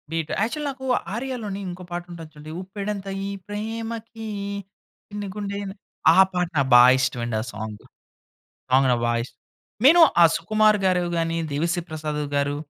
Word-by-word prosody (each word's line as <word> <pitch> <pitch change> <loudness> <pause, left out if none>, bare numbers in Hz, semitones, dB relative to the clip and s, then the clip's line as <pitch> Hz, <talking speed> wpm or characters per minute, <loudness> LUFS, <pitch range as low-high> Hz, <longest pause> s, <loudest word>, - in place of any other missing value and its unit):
Beat 165 -2 -2
actual 295 +7 -1
నాకు 265 -1 -7 0.3
ఆర్య‌లోని 230 -5 -4
ఇంకో 180 +1 -8
పాటుంటది 175 -2 -7
చూడండి, 150 +1 -10
ఉప్పెడంత 200 +1 -5 0.2
ఈ - - -3 0.2
ప్రేమకి 225 +1 -5 0.8
చిన్ని 205 -1 -5
గుండె 200 -1 -4
ఎం 195 - -5 0.4
ఆ - - +6
పాట 180 -1 -1 0.2
బా 120 0 +10 0.2
ఇష్టమండి 120 -3 -1
ఆ - - -4
సాంగ్. 110 0 -7 0.9
అవును 130 -1 +5
ఆ - - -3
వాయిస్. 120 +1 -1 0.5
నేను 330 +6 +8 0.2
ఆ - - +9
సుకుమార్ 215 +5 +3
గారివి, 180 -2 +2
గాని 165 0 0 0.2
దేవిశ్రీ 170 +4 0
ప్రసాద్ 150 -1 -3
గారు, 140 0 0
180 Hz, 140 wpm, -24 LUFS, 150-215 Hz, 0.9 s, బా